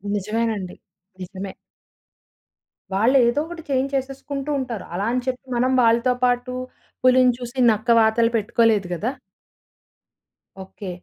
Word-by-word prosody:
నిజమేనండి 210 -2 -2 0.5
నిజమే. 190 +1 -7 1.4
వాళ్ళు 225 +7 +3
ఏదో 240 +5 +1
ఒకటి 340 0 -8
చేంజ్ 275 0 0
చేసేసుకుంటూ 275 +1 -4
ఉంటారు. 240 -6 -5
అలా 195 +3 -2
అని 250 +1 0
చెప్పి 255 0 -3
మనం 255 +2 +2
వాళ్ళతో 235 +2 +3
పాటు 245 0 +1 0.5
పులిని 255 -1 +5
చూసి 245 +1 -8
నక్క 220 +2 0
వాతలు 225 +1 +3
పెట్టుకోలేదు 220 -2 +2
గదా! 220 +9 -2 1.5
ఓకే. 190 +1 -9
235 Hz, 115 wpm, -22 LUFS, 215-255 Hz, 1.5 s, పులిని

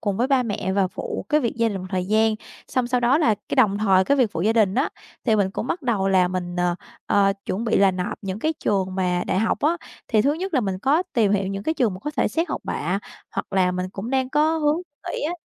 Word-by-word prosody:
cùng 200 -3 -1
với 245 - +1
ba 265 -2 +3
mẹ 200 -4 -2
và 195 -2 +2
phụ - - -5
cái 300 0 +3
việc 235 -2 -2
gia 230 -1 +2
đình 200 -2 -3
một 185 - -7
thời 185 -1 -1
gian. 220 +1 +3 0.3
Xong 255 -3 0
sau 250 0 +1
đó 245 +5 +3
là 230 -10 +3
cái - - -1
đồng 205 -5 +4
thời 190 -3 +4
cái 280 - +2
việc 245 -6 +3
phụ 165 - -3
gia 220 +2 +3
đình 210 -4 +3
á, 265 +4 +2 0.4
thì 220 -3 +3
mình 195 -2 +1
cũng 220 - -4
bắt 335 +2 -2
đầu 205 -6 +1
là 185 -2 +4
mình, 180 -1 -4
ờ, 175 0 +1 0.3
ờ, 195 -1 +3
chuẩn 215 +5 -2
bị 225 - +2
là 195 -1 +5
nộp 185 +3 -4
những 195 +1 -4
cái 315 +6 0
trường 190 -2 0
mà 180 -2 0
đại 185 - 0
học 220 0 +1
á. 320 +4 +2 0.3
Thì 215 -1 +3
thứ 285 - +3
nhất 365 +2 -4
là 260 - +4
mình 190 -3 -2
có 285 - +2
tìm 210 -4 +3
hiểu 195 -1 +1
những 195 0 -4
cái 315 - -1
trường 225 -10 +1
mà 185 - -9
có 295 - -4
thể - - +2
xét 330 +1 -1
học - - -3
bạ, 180 +5 -1 0.3
hoặc - - -4
là 185 -1 +2
mình 180 +1 -3
cũng 200 +5 -6
đang 260 -1 +1
có 310 +2 +2
hướng 300 0 +2 0.4
nghỉ - - -3
á. 315 +4 -1
210 Hz, 280 wpm, -23 LUFS, 190-260 Hz, 0.4 s, là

